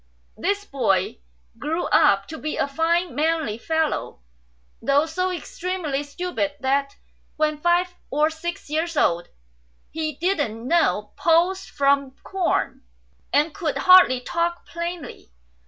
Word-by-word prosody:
This 400 - -1
boy 195 - 0 0.4
grew 325 +3 -2
up 195 0 +4
to 315 0 -7
be 305 +1 -3
a - - +1
fine 330 +2 0
manly 305 -6 0
fellow, 320 +2 -1 0.6
though 280 +5 +3
so 365 +3 -1
extremely 350 -5 -3
stupid 295 0 -3
that 275 +1 0 0.4
when 305 -1 0
five 350 +2 +2 0.2
or 305 +2 +2
six 335 +2 -6
years 320 +2 -2
old 170 -8 +2 0.6
he 310 0 -2
didn't 290 - -1
know 275 -10 +2
pulse 350 +3 +2
from 275 -1 +1
corn, 380 -2 -1 0.5
and 295 +2 +2
could 335 -7 -2
hardly 365 -9 +7
talk 340 +6 -2
plainly. 340 - -6
315 Hz, 120 wpm, -23 LUFS, 280-345 Hz, 0.6 s, hardly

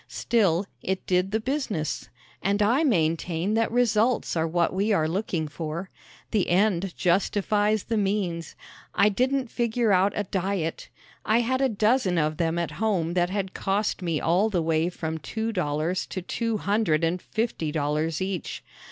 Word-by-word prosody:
Still, 200 -6 +1 0.2
it 190 0 -2
did 180 +1 +1
the 220 +2 0
business. 225 - -2 0.3
And 200 +2 +1
I 245 +9 +3
maintain 170 - +1
that 225 0 +1
results 235 -2 +2
are 160 0 +1
what 170 +1 +1
we 200 +4 +1
are 160 -6 +2
looking 170 -2 -2
for. 160 +4 -5 0.4
The 210 -4 +1
end 190 0 +1
justifies 205 +3 +1
the 225 - -1
means. 195 -5 -1 0.4
I 205 - +5
didn't 255 +3 0
figure 235 -2 +1
out 190 +1 +3
a 205 - 0
diet. 190 -3 -2 0.3
I 225 +2 +3
had 260 +3 0
a 270 - +3
dozen 215 -3 +2
of 155 -1 +1
them 165 0 0
at 170 -2 -1
home 180 -7 +1
that 175 0 +2
had 190 -1 -3
cost 200 +1 -1
me 165 -4 -1
all 185 +6 +2
the 180 -6 0
way 160 +1 +1
from 160 -2 -4
two 220 +9 -3
dollars 165 0 -1
to 185 - -5
two 230 +3 -1
hundred 200 -6 +1
and 170 +2 0
fifty 220 -9 -2
dollars 155 +3 -1
each. 190 -2 -4
190 Hz, 165 wpm, -26 LUFS, 165-215 Hz, 0.4 s, I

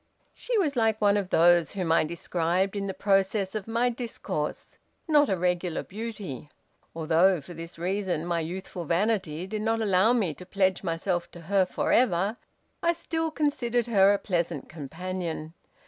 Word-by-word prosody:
She 485 -2 -2
was 310 -9 +1
like 225 -2 +2
one 205 -1 +4
of 200 -3 -1
those 175 0 +4
whom 185 -5 -1
I 165 - +4
described 170 +4 -1
in 200 -1 -2
the 190 - -3
process 195 0 +1
of 215 -2 -4
my 235 +2 +1
discourse; 235 -1 -5 0.3
not 295 -2 +4
a 190 - +1
regular 180 -1 -1
beauty. 205 - -7 0.5
Although 165 +3 +3
for 150 +5 -11
this 165 +1 -9
reason 180 -2 -1
my 170 -1 0
youthful 175 +1 -5
vanity 180 -2 0
did 210 +2 -4
not 225 +1 +1
allow 205 0 +3
me 210 -10 +1
to 180 - -11
pledge 190 0 +1
myself 175 0 -2
to 175 - -10
her 190 +2 +2
forever, 205 0 +1 0.4
I 340 0 +3
still 325 -1 -2
considered 255 -7 0
her 200 -4 +5
a 205 - +3
pleasant 170 -7 -2
companion. 165 +1 -5
190 Hz, 165 wpm, -27 LUFS, 170-220 Hz, 0.5 s, her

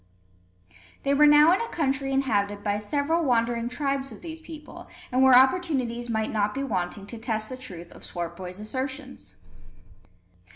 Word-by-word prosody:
They 280 - +2
were 295 +1 +6
now 295 +3 +7
in 380 - +1
a 465 - -2
country 275 -3 -1
inhabited 205 -7 0
by 205 -1 0
several 285 +10 0
wandering 235 -3 +1
tribes 275 0 -2
of - - -11
these 325 -1 -7
people, 315 -2 -11 0.2
and 255 +1 +2
where 265 -1 +7
opportunities 260 -5 +2
might 220 -1 -1
not 210 -1 0
be 275 - -2
wanting 195 -4 -3
to 225 +2 -8
test 220 -2 -2
the 255 - -5
truth 180 -10 -9
of - - -14
Swartboy's 180 +2 -6
assertions. 260 - -6
255 Hz, 160 wpm, -26 LUFS, 210-280 Hz, 0.2 s, now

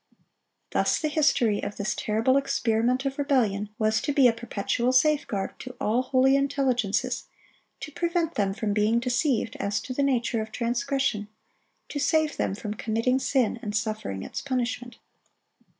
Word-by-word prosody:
Thus - - +2
the 310 - -1
history 250 -8 +2
of 205 - -5
this 205 +1 -1
terrible 225 +5 +1
experiment 250 -1 +1
of 275 +1 -2
rebellion 225 -8 +1
was 215 0 +1
to 290 - -1
be 275 -3 +5
a 235 - +3
perpetual 235 +2 -1
safeguard 260 -8 +1
to 255 -1 -8
all 225 +4 +1
holy 260 +1 +3
intelligences, 265 -6 0 0.6
to 305 - -6
prevent 340 +1 -1
them 195 -2 0
from 210 -1 -1
being 215 +3 +2
deceived 245 -1 0
as 200 +1 -1
to 255 - -6
the 280 - -1
nature 245 -4 +1
of 220 0 -6
transgression, 240 -2 -1 0.6
to 290 - -4
save 310 +1 +1
them 195 - -1
from 210 0 -5
committing 230 +4 0
sin 255 -4 +1
and 210 -4 -4
suffering 215 - -3
its - - -5
punishment. 245 -2 -3
245 Hz, 155 wpm, -26 LUFS, 215-275 Hz, 0.6 s, be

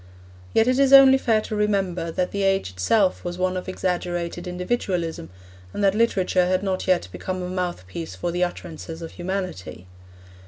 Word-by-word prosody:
Yet 225 - +3
it 255 +1 +2
is 275 -1 +4
only 270 -1 +9
fair 225 -4 +2
to 215 - -5
remember 195 -5 0
that 180 +2 -2
the 200 - -2
age 195 - +1
itself 185 - +1
was 175 0 -4
one 185 0 0
of 185 0 -4
exaggerated 175 -1 -3
individualism 180 - -2 0.5
and - - -2
that 195 -1 +4
literature 190 -5 +2
had 185 +1 +1
not 190 -2 -2
yet 185 - +2
become 185 - -4
a - - -4
mouthpiece 175 - -4
for 175 - -3
the 175 +1 0
utterances 165 -1 -6
of 165 - -7
humanity. 180 - -5
185 Hz, 170 wpm, -23 LUFS, 175-200 Hz, 0.5 s, only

